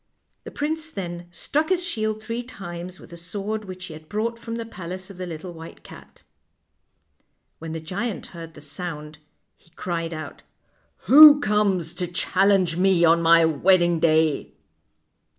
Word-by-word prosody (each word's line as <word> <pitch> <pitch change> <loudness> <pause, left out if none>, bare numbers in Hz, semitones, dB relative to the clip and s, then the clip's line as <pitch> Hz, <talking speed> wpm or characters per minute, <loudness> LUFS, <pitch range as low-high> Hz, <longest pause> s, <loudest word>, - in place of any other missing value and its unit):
The - - -6
prince 315 +2 -3
then 175 - -6
struck 290 - -2
his 360 -2 +1
shield 215 -9 -3
three 230 +2 -4
times 185 -6 -8
with - - -15
the 170 - -10
sword 205 +5 -5
which 185 -1 -8
he 170 - -9
had 155 0 -13
brought 230 +2 -2
from 230 0 -6
the 230 0 -5
palace 185 -2 -8
of 190 - -14
the 185 0 -5
little 170 +2 -7
white 165 0 -12
cat. - - -15 1.4
When 160 0 -7
the 165 - -4
giant 195 +7 -4
heard 165 -1 -10
the - - -12
sound 150 0 -6 0.4
he - - -28
cried 165 0 -4
out: 155 -1 -8 0.3
" - - -41
Who 295 +1 +10
comes 200 - 0
to 180 - -3
challenge 185 0 +2
me 185 -2 +4
on 165 +1 +4
my 165 0 +6
wedding 175 +2 +3
day? 160 -2 +1
180 Hz, 165 wpm, -23 LUFS, 165-215 Hz, 1.4 s, Who